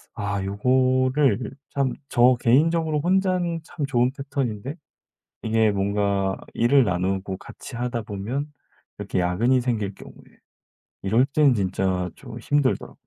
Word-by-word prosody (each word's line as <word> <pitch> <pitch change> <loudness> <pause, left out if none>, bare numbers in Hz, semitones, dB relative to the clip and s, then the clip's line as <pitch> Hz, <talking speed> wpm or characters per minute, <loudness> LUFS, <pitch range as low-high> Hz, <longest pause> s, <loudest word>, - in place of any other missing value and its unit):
아 100 -2 -2
요거를 130 +4 +2 0.2
참 135 -2 +1 0.2
저 125 +1 +5
개인적으로 155 +5 +2
혼자는 180 -1 +1
참 155 -2 -4
좋은 125 -2 +1
패턴인데 135 -2 -3 0.7
이게 110 -1 +2
뭔가 100 -1 0 0.2
일을 130 +4 +4
나누고 95 +1 -1
같이 - - -11
하다 120 -1 -2
보면 115 +9 -4 0.5
이렇게 - - -2
야근이 110 +9 +2
생길 110 -5 -2
경우에 - - -15 0.7
이럴 115 +7 +3
땐 140 -1 +3
진짜 95 -2 -1
좀 - - -10
힘들더라. 145 -2 0
120 Hz, 260 characters per minute, -24 LUFS, 100-140 Hz, 0.7 s, 저